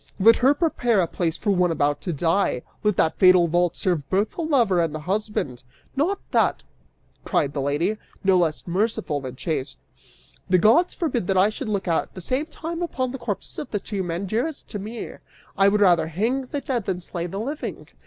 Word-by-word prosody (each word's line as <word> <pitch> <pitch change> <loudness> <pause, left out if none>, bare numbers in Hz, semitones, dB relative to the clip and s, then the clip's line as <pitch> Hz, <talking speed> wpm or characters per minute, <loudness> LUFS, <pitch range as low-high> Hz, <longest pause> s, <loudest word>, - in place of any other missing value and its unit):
Let 225 +4 +7
her 270 +3 +4
prepare 245 - +1
a 180 - +3
place 165 -1 -2
for 205 - 0
one 180 -2 +3
about 145 -3 0
to 180 - -3
die, 165 -3 +1 0.2
let 210 -3 +1
that 160 - +1
fatal 185 -2 +6
vault 175 +1 +1
serve 165 -7 -1
both 200 +3 +1
the - - -5
lover 240 - +3
and 160 -2 -1
the 155 - -5
husband! 190 - -2 0.3
'Not 340 +9 +1
that,' - - +2 0.6
cried 145 - +1
out - - -20
the 140 - -2
lady, 155 +10 0 0.3
no 190 -1 +4
less 165 -4 +1
merciful 190 -4 -1
than 130 -1 -7
chaste, 135 -1 -3 0.7
'the 185 - +5
gods 230 - +4
forbid 250 - -1
that 195 - +1
I 195 +3 +4
should 220 +2 -5
look 200 -3 -2
at 165 -2 -1
the - - -6
same 260 - -1
time 330 +2 -6
upon 260 -7 -2
the 265 - -6
corpses 210 -5 -4
of - - -6
the 205 - -2
two 200 0 -4
men 175 +1 -3
dearest 240 - -2
to 205 - -4
me; 220 +4 -6 0.5
I 195 - +4
would 210 +1 +3
rather 175 -5 +4
hang 230 - -1
the 285 +2 -3
dead 245 -7 -2
than 185 -2 -2
slay 175 0 -5
the 195 +3 -5
living! 285 +7 -5
195 Hz, 210 wpm, -24 LUFS, 170-240 Hz, 0.7 s, Let